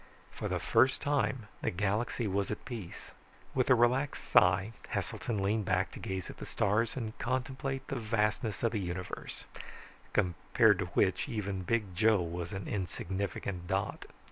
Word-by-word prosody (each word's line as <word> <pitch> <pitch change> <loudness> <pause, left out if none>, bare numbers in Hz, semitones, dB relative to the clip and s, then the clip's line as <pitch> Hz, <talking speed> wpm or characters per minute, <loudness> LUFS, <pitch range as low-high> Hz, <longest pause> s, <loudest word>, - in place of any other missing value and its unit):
For - - -4
the - - 0
first 130 0 +4
time, 135 -5 0
the - - +1
galaxy 105 +6 0
was 100 0 0
at 105 - -4
peace. 110 -8 -7 0.4
With 130 0 +1
a 130 - +8
relaxed 125 +4 +2
sigh, 90 +4 +5 0.2
Heselton 105 -5 -2
leaned 105 +1 +1
back 90 0 +1
to - - -9
gaze 95 -2 -3
at - - -9
the - - -7
stars 110 +3 +1
and 110 -3 -4
contemplate 130 +2 -2
the - - -2
vastness 110 0 0
of 115 - +3
the 110 - -1
universe, 90 0 -5 0.7
compared 105 +2 +3
to 95 - 0
which 95 +8 +2
even 100 -5 -2
Big 105 0 0
Joe 110 +2 +5
was 85 0 -3
an 95 -2 -5
insignificant 95 -1 -3
dot. - - -1
105 Hz, 160 wpm, -32 LUFS, 95-120 Hz, 0.7 s, a